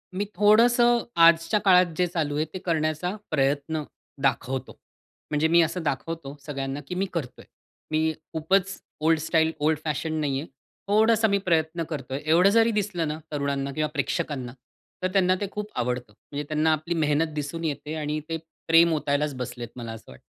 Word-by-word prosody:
मी 200 +2 -1
थोडंसं 235 +3 +5
आजच्या 165 +4 +5
काळात 185 -1 +7
जे 180 - +3
चालू 155 -4 -2
आहे, 155 +1 +1
ते 185 +4 -8
करण्याचा 160 +2 0 0.2
प्रयत्न 145 +2 0 0.4
दाखवतो. 130 0 -1 0.5
म्हणजे 150 +2 +2
मी 170 +1 +5
असं 165 +2 -1
दाखवतो 145 0 -3
सगळ्यांना, 135 -1 -4
की 180 - -4
मी 190 - 0
करतोय. 150 -8 -5 0.5
मी 160 0 +1 0.2
खूपच 190 +5 +1 0.2
ओल्ड 160 0 +3
स्टाईल, 160 +1 +2
ओल्ड 155 0 +1
फॅशन 155 +1 -2
नाही 135 -2 0
आहे. 155 - -7 0.4
थोडासा 220 +2 +4
मी 200 -1 +2
प्रयत्न 165 0 +1
करतोय. 135 -3 -4
एवढं 170 +5 +5
जरी 230 +2 +4
दिसलं 195 -6 -1
ना, 150 - -3
तरुणांना 140 -1 -2
किंवा 155 0 -1
प्रेक्षकांना 140 -4 -2 0.5
तर 185 - +3
त्यांना 185 -2 +4
ते 200 - -1
खूप 210 +1 -5
आवडतं. 125 -2 -2
म्हणजे 145 +7 -7
त्यांना 155 +1 +2
आपली 155 +3 -2
मेहनत 155 0 +1
दिसून 150 +3 -4
येते 150 0 -3
आणि 150 0 -2
ते 165 - -1 0.3
प्रेम 165 0 +6
ओतायलाच 145 -1 0
बसलेत 120 -1 -5
मला 115 -2 -6
असं 110 -11 -12
वाटतं. 65 - -15
160 Hz, 170 wpm, -25 LUFS, 145-180 Hz, 0.5 s, काळात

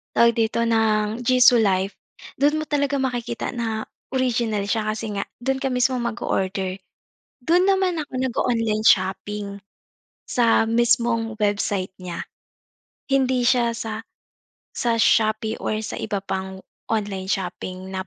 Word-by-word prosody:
tawag 235 0 +6
dito, 230 0 0
ng 220 -1 +1
Jisu 250 -1 +5
Life, 195 -1 +1 0.4
do'n 290 +2 +3
mo 310 - -1
talaga 285 -2 0
makikita 245 -4 -2
na 225 -3 -2 0.3
original 235 -5 0
siya, 215 +1 -1
kasi 220 -1 -5
nga 200 -1 -3 0.2
do'n 265 0 0
ka 270 - -1
mismong 250 -1 +1
mag-o-order. 190 -4 -2 0.6
Do'n 350 +7 +3
naman 380 -3 +2
ako 295 - -5
nag-o-online 230 -4 0
shopping, 200 +1 +1 0.7
sa 230 -2 +3
mismong 230 -1 +1
website 205 -2 0
niya. 175 -2 -5 0.9
Hindi 260 -2 +2
siya 240 -1 +3
sa 225 0 -5 0.6
sa 235 -1 0
Shopee 220 0 +2
or 215 0 -2
sa - - -5
iba 205 -3 -3
pang 190 0 -5 0.2
online 200 -4 -2
shopping 185 0 -4
na 190 0 -4
225 Hz, 130 wpm, -23 LUFS, 205-245 Hz, 0.9 s, tawag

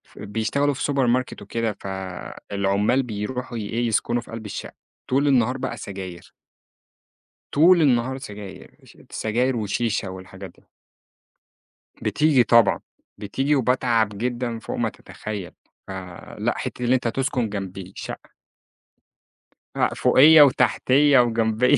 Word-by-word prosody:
بيشتغلوا 115 +8 -1
في 135 - -5
سوبر 135 -3 +1
ماركت 125 +1 0
وكده، 115 -3 -3
فالعُمَّال 100 +4 -2
بيروحوا 120 +2 -5
ي - - -3
إيه، 120 +1 -1
يسكُنوا 120 +2 0
في - - -15
قلب 115 -1 -7
الشقة، 105 - -6 0.4
طول 140 +3 +2
النهار 125 -2 +3
بقى - - -4
سجاير. 95 -3 -8 1.2
طول 170 +4 +5
النهار 130 -2 +2
سجاير، 105 -7 -10
ش - - -18
سجاير 120 +4 0
وشيشة 105 -1 -1
والحاجات 95 0 -9
دي. - - -26 1.3
بتيجي 150 -5 +3
طبعًا، 115 -2 +4 0.4
بتيجي 135 +8 0
وباتعب 120 -4 +2
جدًا 120 0 -2
فوق - - -6
ما - - 0
تتخيّل، 105 -4 -8 0.4
فلأ، 95 -2 -5
حتِّة 125 - -5
اللي 125 +2 +3
أنت 125 -2 -1
تسكُن 130 -1 -1
جنب 95 -2 -6
شقة - - -8 1.5
لأ، - - +1
فوقيّا 155 +3 +7
وتحتيّا 140 0 +4
وجنبيّا 115 +2 +3
115 Hz, 120 wpm, -23 LUFS, 100-130 Hz, 1.5 s, فوقيّا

